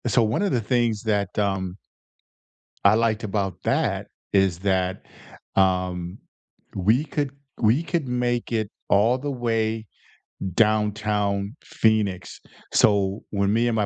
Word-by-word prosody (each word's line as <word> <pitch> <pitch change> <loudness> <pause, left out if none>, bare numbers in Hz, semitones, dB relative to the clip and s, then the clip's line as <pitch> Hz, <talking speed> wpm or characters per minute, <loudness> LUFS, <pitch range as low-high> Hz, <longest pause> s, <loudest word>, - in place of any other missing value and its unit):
So, 120 +1 +3
one 110 - 0
of 200 -2 +1
the 120 - +1
things 115 -1 0
that, 105 -3 -1
um, 95 -3 -1 1.1
I 100 +1 +7
liked 110 -1 +1
about 100 -3 -1
that, - - 0 0.3
is 95 -3 +3
that, 95 -2 0 0.5
um, 90 -1 +1 0.6
we 110 +9 +2
could 145 -2 -2 0.3
we 115 +7 +3
could 170 -3 -2
make 120 -1 -1
it 110 -3 -1 0.2
all 110 +5 +4
the 145 +2 -3
way 115 -3 -1 0.7
Downtown 105 0 +1
Phoenix, 110 - 0 0.3
so, 100 -1 +3
when 100 -1 +1
me 115 +2 +2
and 120 - +1
my 105 -2 +1
105 Hz, 130 wpm, -24 LUFS, 100-115 Hz, 1.1 s, I